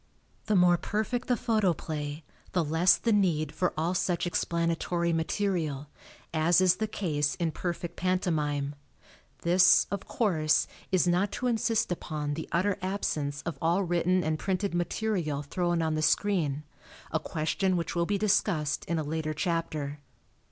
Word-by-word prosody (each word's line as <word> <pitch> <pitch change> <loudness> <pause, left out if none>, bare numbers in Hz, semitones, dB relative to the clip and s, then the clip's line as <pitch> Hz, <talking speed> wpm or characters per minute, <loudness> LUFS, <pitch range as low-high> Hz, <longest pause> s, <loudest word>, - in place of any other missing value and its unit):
The 215 - +2
more 180 -1 +5
perfect 220 +4 -2
the 245 - +2
photoplay, 160 -9 -1 0.3
the 180 - +2
less 160 +4 +4
the 230 - 0
need 165 -7 +2
for 180 - 0
all 165 +3 0
such 180 -1 0
explanatory 170 0 0
material, 160 -4 -1 0.4
as 160 +2 +4
is 185 -1 +4
the 220 - -1
case 150 -8 -1
in 170 -3 -1
perfect 175 0 -4
pantomime. 150 -6 0 0.7
This, 180 +2 +6
of 200 -1 -4
course, 160 -9 +2 0.3
is 185 -1 +3
not 180 +3 +2
to 250 - -3
insist 230 -4 +1
upon 150 -4 -3
the 160 +2 -5
utter 190 +3 +1
absence 150 -7 -2
of 170 - -5
all 170 +4 +2
written 175 +1 +1
and 155 0 -1
printed 195 0 -1
material 175 -4 -1
thrown 175 +2 0
on 160 -1 0
the 155 - -1
screen 160 -4 +1 0.5
a 160 - +1
question 165 +5 -1
which 170 -2 -3
will 170 0 0
be 205 - +1
discussed 190 -7 +1
in 170 - -1
a 155 - -1
later 155 +1 -3
chapter. 155 -3 -2
170 Hz, 150 wpm, -28 LUFS, 155-185 Hz, 0.7 s, This